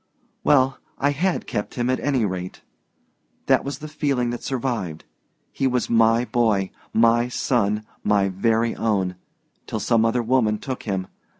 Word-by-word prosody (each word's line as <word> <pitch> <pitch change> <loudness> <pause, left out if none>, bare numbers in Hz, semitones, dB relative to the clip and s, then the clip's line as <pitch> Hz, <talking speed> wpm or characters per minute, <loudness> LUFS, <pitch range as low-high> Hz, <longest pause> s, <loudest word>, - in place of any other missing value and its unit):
"Well 135 -2 +3 0.2
I 145 +1 +2
had 175 +6 0
kept 105 - -4
him, 120 -1 -1
at 130 0 +1
any 135 -6 +1
rate. 90 -2 -5 0.8
That - - +3
was 140 - -4
the 155 - -8
feeling 140 -5 -1
that 120 - -5
survived. 115 - -3 0.5
He 135 - 0
was 125 -1 0
my 115 +1 +4
boy, 110 -6 +1 0.2
my 115 +1 +4
son, 110 -4 0 0.2
my 100 -1 +3
very 115 +4 +1
own 95 -5 0 0.5
till - - -3
some 115 -1 +2
other 115 +2 +1
woman 115 -3 +2
took 130 +4 -5
him. 95 -1 -1
115 Hz, 155 wpm, -23 LUFS, 105-130 Hz, 0.8 s, my